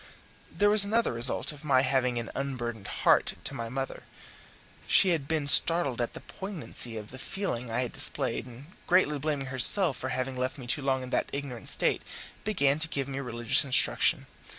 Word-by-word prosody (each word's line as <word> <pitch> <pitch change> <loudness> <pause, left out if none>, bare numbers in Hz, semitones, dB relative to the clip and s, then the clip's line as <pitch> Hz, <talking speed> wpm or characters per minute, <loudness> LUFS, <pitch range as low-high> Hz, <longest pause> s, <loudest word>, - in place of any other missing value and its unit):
There 205 0 +1
was 210 -1 +6
another 220 - 0
result 120 +5 0
of 150 0 -14
my 135 -3 +2
having 130 -2 0 0.2
unburdened 120 -6 -5
my - - -7
heart - - +1
to - - -5
my 115 -1 -6
mother. 135 +2 -5 0.9
She 190 - +4
had 160 -6 -1
been 155 -2 -2
startled 145 -5 +7
at 120 - -4
the - - -8
poignancy 165 - -6
of 105 -1 -9
the 130 - -10
feeling 155 - -5
I 115 +2 -2
had 125 - -6
displayed, - - +1
and, 125 +3 -13 0.2
greatly 170 -5 +2
blaming 140 -2 -4
herself 140 +3 +4
for 130 - -5
having 130 0 -3
left 130 +3 -4
me 130 - -10
too 130 +4 0
long 135 -1 -1
in 125 - -9
that - - -1
ignorant 140 -4 -5
state, - - 0 0.4
began 145 -9 0
to 165 - 0
give 140 -4 -4
me 135 0 -6
religious 120 -2 +2
instruction. 135 -3 +3
135 Hz, 190 wpm, -27 LUFS, 125-155 Hz, 0.9 s, startled